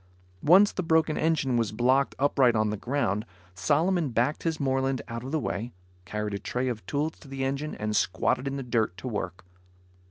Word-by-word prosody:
Once 195 +6 +6
the - - -2
broken 160 -2 +2
engine 140 -6 +1
was 115 -3 0
blocked 130 +5 +2
upright 130 -3 +3
on 110 -1 +2
the - - -1
ground, 105 -3 -1 0.3
Solomon 155 - +1
backed 125 +5 0
his 165 -2 -1
Moreland 135 -2 0
out 115 0 -5
of 130 - -6
the 160 - +1
way, 120 -3 -3 0.3
carried 105 +1 -3
a 100 - -2
tray 125 +4 -2
of 110 -5 -4
tools 150 +3 -2
to - - -15
the 135 0 -4
engine 140 +3 -2
and 105 0 -2
squatted 130 +4 +1
in 135 - -2
the 135 - -4
dirt 115 -7 0
to 130 - -6
work. 95 -5 -4
130 Hz, 195 wpm, -27 LUFS, 110-145 Hz, 0.3 s, Once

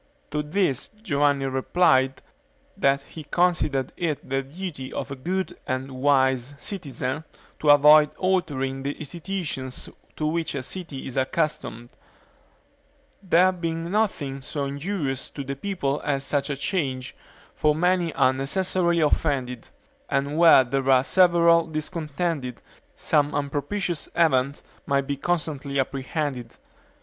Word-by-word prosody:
To 150 - 0
this 150 -3 0 0.2
Giovanni 145 -5 +2
replied, 135 0 +2 0.5
that 140 0 +2
he 160 +2 -10
considered 155 -6 +1
it 155 -5 -2
the 135 +1 0
duty 145 -2 -7
of 135 0 -5
a - - -3
good 180 +6 -3
and 130 0 -2
wise 130 0 +2
citizen 140 - -4 0.4
to 150 - +1
avoid 150 +1 +8
altering 145 -8 -1
the 140 +1 -2
institutions 160 -5 -4 0.3
to 155 - -2
which 160 -1 -1
a 135 - -3
city 165 -2 -6
is 130 - -6
accustomed; 130 -4 -1 1.3
there 185 -1 +4
being 165 -1 -4
nothing 160 -11 -1
so 140 +2 -3
injurious 140 -1 -3
to 140 - -6
the 140 +1 -4
people 145 -4 -2
as 140 -2 0
such 140 +1 -1
a 140 - -2
change; 135 -6 -2 0.4
for 150 -1 +2
many 175 0 +2
are 130 - +3
necessarily 170 +5 +1
offended, 135 -5 0 0.4
and 140 +2 0
where 165 -5 +7
there 135 +2 -1
are 130 -1 +6
several 170 0 +4
discontented, 155 -3 -3 0.4
some 145 -1 +1
unpropitious 145 +5 -2
event 140 -4 +2 0.2
may 140 0 +2
be 140 +1 -3
constantly 145 -3 -2
apprehended. 135 -2 -3
145 Hz, 125 wpm, -25 LUFS, 135-170 Hz, 1.3 s, avoid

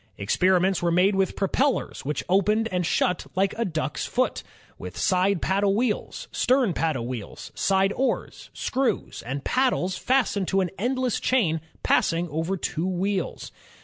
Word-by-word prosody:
Experiments 185 - +2
were 175 - +1
made 180 +4 +3
with 190 -1 0
propellers 255 +7 0
which 150 +2 -2
opened 210 +4 +2
and 180 -2 0
shut 180 - 0
like 195 +1 +1
a 230 - 0
duck's 155 -6 -2
foot, 255 +1 0 0.4
with - - -8
side 185 -1 +2
paddle 195 +1 +2
wheels, 225 -1 -2
stern 250 -7 +2
paddle 155 -9 -1
wheels, 120 -4 -7
side 195 0 +2
oars, 270 - -2
screws, 265 0 -2
and 135 +3 -4
paddles 250 -8 +1
fastened 245 -7 +1
to 195 - +2
an 180 -3 -2
endless 255 +1 0
chain 175 -12 +1 0.2
passing 170 +1 +2
over 165 +6 -2
two 170 0 -2
wheels. 190 0 -2
190 Hz, 150 wpm, -25 LUFS, 175-220 Hz, 0.4 s, made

